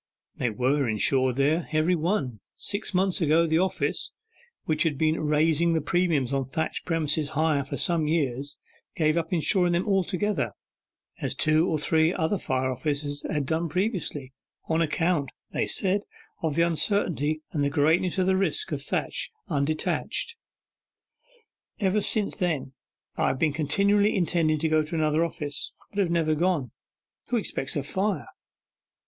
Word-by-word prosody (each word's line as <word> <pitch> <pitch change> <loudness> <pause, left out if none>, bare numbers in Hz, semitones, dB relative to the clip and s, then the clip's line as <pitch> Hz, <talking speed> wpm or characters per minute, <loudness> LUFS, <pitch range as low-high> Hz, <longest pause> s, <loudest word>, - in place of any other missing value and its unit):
'They 120 - 0
were 130 +4 +1
insured 130 +4 +2
there 150 +5 +1
every 155 +3 +3
one. 155 - -1 0.2
Six 205 +2 -2
months 190 -1 +1
ago 165 +1 +4
the 160 0 +2
office, 190 +1 -1 0.6
which 155 -1 0
had 155 -4 +1
been 155 +2 +1
raising 155 +2 +2
the 160 - +2
premiums 155 -5 +1
on 135 -1 +1
thatched 160 +5 -3
premises 155 -3 0
higher 155 -3 +2
for 135 - -5
some 165 -3 +2
years, 145 -3 -1 0.4
gave 155 -1 +2
up 165 -1 -1
insuring 180 +1 +2
them 175 +4 0
altogether, 190 - 0 0.7
as - - -1
two 155 +3 +3
or 160 - +1
three 160 +2 +2
other 180 +2 0
fire 130 -3 -1
offices 145 +2 -3
had 150 -2 0
done 160 +4 -1
previously, 170 - -2 0.3
on 160 0 +1
account, 165 -2 +1 0.2
they - - -1
said, 195 +1 +2 0.4
of 160 -3 -1
the 170 - +4
uncertainty 160 -3 0
and 145 -2 0
greatness 160 +5 +2
of 185 - +2
the 190 0 +3
risk 195 - -1
of - - -2
thatch - - -2 0.2
undetached. 150 +1 -1 1.4
Ever 205 0 +2
since 210 0 +1
then 160 -8 -1 0.4
I - - +2
have - - 0
been 155 +1 +1
continually 200 +8 +2
intending 165 -4 +2
to 160 +2 0
go 155 0 +3
to 155 +2 -5
another 155 0 +2
office, 145 -3 -3 0.2
but 205 - -4
have 190 -4 +2
never 165 -2 +2
gone. 155 -6 0 0.6
Who 245 - 0
expects 135 - -1
a 145 - -1
fire? 195 +8 -1
160 Hz, 155 wpm, -26 LUFS, 145-180 Hz, 1.4 s, ago